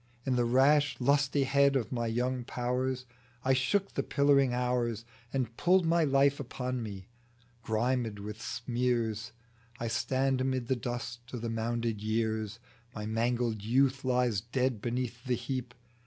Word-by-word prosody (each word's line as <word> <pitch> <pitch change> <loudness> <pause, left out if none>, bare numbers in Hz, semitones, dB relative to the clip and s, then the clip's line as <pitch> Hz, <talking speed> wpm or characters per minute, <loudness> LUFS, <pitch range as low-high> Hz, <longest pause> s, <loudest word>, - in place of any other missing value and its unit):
In 130 - +1
the 120 -1 +2
rash 140 +4 +4
lustihead 140 +1 +3
of 125 -5 0
my 120 -2 -1
young 125 +2 -1
powers, 125 +1 -2 0.4
I 135 - +4
shook 190 +10 +1
the - - 0
pillaring 140 -2 +3
hours 120 -2 0 0.3
And 125 -4 -2
pulled 180 0 +4
my 165 0 +3
life 140 -1 +3
upon 125 -1 -3
me; 100 -4 -7 0.5
grimed 115 0 0
with 105 +2 -7
smears, 115 -2 -1 0.5
I 115 - -2
stand 130 +3 +1
amid 130 -2 0
the 130 - +3
dust 120 0 -4
o' 125 - -4
the 115 0 -3
mounded 115 -1 -1
years 110 0 -1 0.4
My 105 -1 -4
mangled 115 0 0
youth 135 +4 +2
lies 125 -5 +1
dead 125 -1 -1
beneath 120 0 -3
the 125 -1 +1
heap. 125 +1 -4
125 Hz, 145 wpm, -31 LUFS, 115-130 Hz, 0.5 s, rash